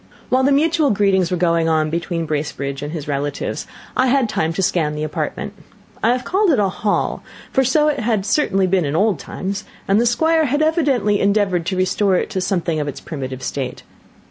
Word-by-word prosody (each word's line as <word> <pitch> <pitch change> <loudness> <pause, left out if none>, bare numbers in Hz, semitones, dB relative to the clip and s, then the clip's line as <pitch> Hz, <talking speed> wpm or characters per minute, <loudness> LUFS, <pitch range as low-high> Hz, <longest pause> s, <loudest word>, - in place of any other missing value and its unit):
While 255 +1 +3
the 275 - +3
mutual 310 +1 +3
greetings 195 -4 +2
were 180 - -1
going 165 -1 +2
on 155 -1 +1
between 170 0 -2
Bracebridge 145 -2 -3
and 145 +1 -4
his 155 -3 -6
relatives, 145 0 -3 0.3
I 255 - +3
had 260 -1 +3
time 160 -6 -1
to 190 - -1
scan 155 -4 +1
the 150 - -3
apartment. 155 - -4 0.5
I 225 - +3
have 250 0 0
called 390 +1 +1
it 290 - +4
a 200 -2 +2
hall, 205 +2 -1 0.3
for 265 - +3
so 300 +4 +3
it 300 - +1
had 220 -3 0
certainly 195 -5 +2
been 185 -1 +2
in 145 0 -2
old 200 -2 +2
times, 195 +2 -5 0.2
and 200 +3 +3
the 240 - +2
Squire 320 +6 +2
had 290 +3 +1
evidently 275 -10 +2
endeavoured 200 -4 +1
to 190 - -1
restore 185 +1 +2
it - - -1
to 190 -3 -1
something 170 -4 -1
of 145 - -2
its 145 - -5
primitive 130 -4 -6
state. 135 -1 -4
190 Hz, 205 wpm, -19 LUFS, 160-250 Hz, 0.5 s, it